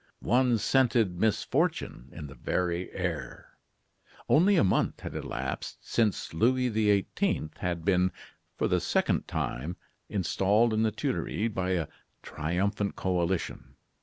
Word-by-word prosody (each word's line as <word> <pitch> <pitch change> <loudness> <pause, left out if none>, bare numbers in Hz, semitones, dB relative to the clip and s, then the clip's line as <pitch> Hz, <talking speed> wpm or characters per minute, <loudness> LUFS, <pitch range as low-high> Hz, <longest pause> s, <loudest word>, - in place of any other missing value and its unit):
One 125 0 +3
scented 115 -6 +2
misfortune 95 - 0
in 80 - -8
the 70 - -9
very 90 +6 -2
air. 85 -9 -5 0.7
Only 185 +7 +5
a - - +5
month 95 - +1
had - - -6
elapsed - - -5
since 110 -8 0
Louis 125 +8 +2
XVIII. 105 - +1
had 85 -2 -2
been, 95 -1 +3 0.5
for - - +1
the - - +2
second - - +1
time, 75 +9 -3 0.3
installed 105 +4 +2
in 110 - +2
the 110 - +3
Tuileries 110 +1 -1
by 95 -2 -1
a 85 -5 0 0.4
triumphant 100 +6 -1
coalition. 85 -7 -2
95 Hz, 125 wpm, -29 LUFS, 85-110 Hz, 0.7 s, Only